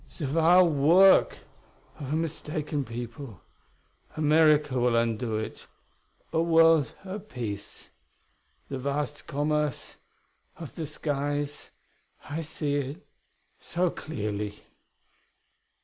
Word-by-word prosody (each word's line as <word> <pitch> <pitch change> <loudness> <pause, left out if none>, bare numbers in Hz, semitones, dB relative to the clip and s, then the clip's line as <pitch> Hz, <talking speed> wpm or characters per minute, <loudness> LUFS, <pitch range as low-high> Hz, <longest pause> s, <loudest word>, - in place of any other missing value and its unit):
"The 155 - -3
wild 165 +4 +5
work 170 +7 +5 0.6
of 140 -2 -6
a - - +1
mistaken 155 -2 -3
people. 120 - -7 0.8
America 150 -3 +4
will 120 -1 +2
undo 115 0 0
it.... 110 - -6 0.7
A 160 - +2
world 165 -4 +4
at 200 +2 -7
peace.... 105 -5 -7 0.8
The 135 - -5
vast 145 +2 -3
commerce 150 -1 -1 0.6
of 165 -4 -9
the 160 -3 -5
skies 145 -1 -3 0.6
I 150 +3 -3
see 150 -2 -2
it 145 +6 -5 0.5
so 175 0 -1
clearly.... 105 -7 -5
145 Hz, 100 wpm, -27 LUFS, 130-160 Hz, 0.8 s, wild